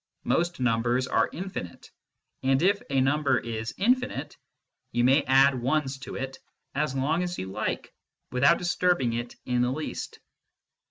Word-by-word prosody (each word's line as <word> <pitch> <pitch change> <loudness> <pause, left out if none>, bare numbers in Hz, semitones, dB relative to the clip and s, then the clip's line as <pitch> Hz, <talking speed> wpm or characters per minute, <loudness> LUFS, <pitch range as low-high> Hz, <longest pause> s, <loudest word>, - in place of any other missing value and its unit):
Most 170 -2 0
numbers 120 +1 +1
are - - +2
infinite, 170 - -7 0.5
and 135 +3 +2
if 200 +2 +3
a 135 -1 +2
number 145 +2 +2
is 110 -1 -4
infinite 250 +6 0 0.6
you 120 0 +1
may 135 +4 +5
add 135 +1 +5
ones 135 +1 0
to 130 - -8
it 135 0 -5 0.3
as 150 -1 -1
long 150 +6 +1
as 180 0 -3
you 95 0 -5
like - - -3 0.4
without 140 +7 +4
disturbing 175 -7 +1
it 120 +1 -4
in 125 -1 +1
the 125 - +2
least. 150 +4 -5
135 Hz, 150 wpm, -27 LUFS, 125-160 Hz, 0.6 s, may